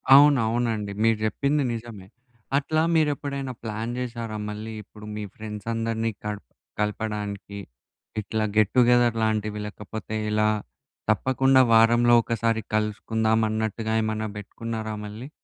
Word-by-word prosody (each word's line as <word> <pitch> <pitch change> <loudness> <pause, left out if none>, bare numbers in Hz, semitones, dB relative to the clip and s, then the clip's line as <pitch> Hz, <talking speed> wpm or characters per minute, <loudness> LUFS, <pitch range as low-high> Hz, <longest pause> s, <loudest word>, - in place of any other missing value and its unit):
అవును, 145 -1 +7
అవునండి. 110 -3 -1
మీరు 115 -1 +4
చెప్పింది 140 +6 +1
నిజమే. 115 -5 -8 0.5
అట్లా 155 +2 +1
మీరు 155 -2 +4
ఎప్పుడైనా 140 -2 -4
ప్లాన్ 110 +1 -3
జేశారా? 115 -3 -4
మళ్ళీ 110 +1 -6
ఇప్పుడు 105 +1 -13
మీ 105 - -4
ఫ్రెండ్స్ 105 0 -7
అందరినీ 115 0 -1
కడప 105 -1 -4 0.3
కలపడానికి 105 -1 -3 0.6
ఇట్లా 110 +1 -2
గెట్ 110 -1 +4
టు 125 - +7
గెదర్ 120 -1 +4
లాంటివి 110 -1 0
లేకపోతే 105 +1 -6
ఇలా 105 0 +2 0.6
తప్పకుండా 130 +4 +4
వారంలో 120 +1 +6
ఒకసారి 115 0 0
కలుసుకుందాం 110 +1 +1
అన్నట్టుగా 110 0 -2
ఏమన్నా 110 0 -1
బెట్టుకున్నారా 110 +1 -5
మళ్ళీ? 110 +7 -8
110 Hz, 125 wpm, -25 LUFS, 105-120 Hz, 0.6 s, అవును